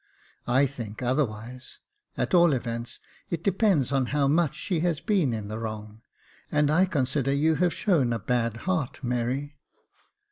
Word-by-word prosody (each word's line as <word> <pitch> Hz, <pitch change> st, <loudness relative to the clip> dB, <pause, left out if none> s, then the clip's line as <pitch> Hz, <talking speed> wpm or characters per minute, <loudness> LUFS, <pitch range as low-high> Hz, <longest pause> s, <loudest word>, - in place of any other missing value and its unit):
" -, -, -38 dB
I 130 Hz, +3 st, +4 dB
think 120 Hz, -4 st, -6 dB
otherwise; 125 Hz, -1 st, -2 dB, 0.4 s
at -, -, -1 dB
all 175 Hz, -3 st, +6 dB
events, 115 Hz, -2 st, -4 dB, 0.3 s
it 170 Hz, -1 st, -3 dB
depends 190 Hz, -, +2 dB
on 135 Hz, -2 st, +1 dB
how 145 Hz, 0 st, +1 dB
much 155 Hz, +1 st, +2 dB
she 180 Hz, -5 st, -2 dB
has 170 Hz, -2 st, 0 dB
been 180 Hz, -, +1 dB
in 110 Hz, -3 st, -4 dB
the 110 Hz, +1 st, -5 dB
wrong, 110 Hz, -1 st, -6 dB, 0.5 s
and 150 Hz, 0 st, +2 dB
I 180 Hz, +5 st, +4 dB
consider 135 Hz, -5 st, 0 dB
you 150 Hz, +3 st, +3 dB
have 180 Hz, -1 st, +2 dB
shown 160 Hz, -, +1 dB
a 115 Hz, -, 0 dB
bad 115 Hz, +1 st, -1 dB
heart, 160 Hz, -8 st, -2 dB
Mary." 130 Hz, +4 st, -2 dB
135 Hz, 165 wpm, -26 LUFS, 120-160 Hz, 0.5 s, all